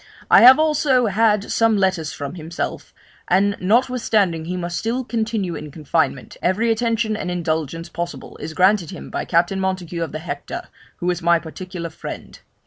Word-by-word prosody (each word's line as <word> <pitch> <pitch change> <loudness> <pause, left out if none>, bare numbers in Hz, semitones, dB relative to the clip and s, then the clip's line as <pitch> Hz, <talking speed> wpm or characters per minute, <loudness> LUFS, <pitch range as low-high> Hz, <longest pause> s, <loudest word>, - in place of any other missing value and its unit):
I - - +8
have 255 +2 +10
also 295 -5 +3
had 210 0 +2
some 225 -2 +3
letters 185 -5 0
from 140 0 -6
himself; 165 -1 -5 0.4
and 200 +2 +3
notwithstanding 215 -6 +1
he 180 +2 -3
must 175 -1 -3
still 240 +3 -1
continue 220 -6 -2
in 150 -1 -7
confinement, 155 +2 -2
every 220 +6 +1
attention 225 -1 0
and 200 -4 -4
indulgence 165 -2 -2
possible 170 0 -6
is 160 - -7
granted 185 -2 +3
him 185 - -9
by - - -3
Captain 175 +3 +1
Montague 185 -3 -2
of 165 -4 -2
the - - -4
Hector, 155 -3 -6 0.3
who 180 +1 0
is 175 0 -4
my 170 0 +4
particular 170 +1 -7
friend. - - -8
185 Hz, 165 wpm, -21 LUFS, 170-220 Hz, 0.4 s, have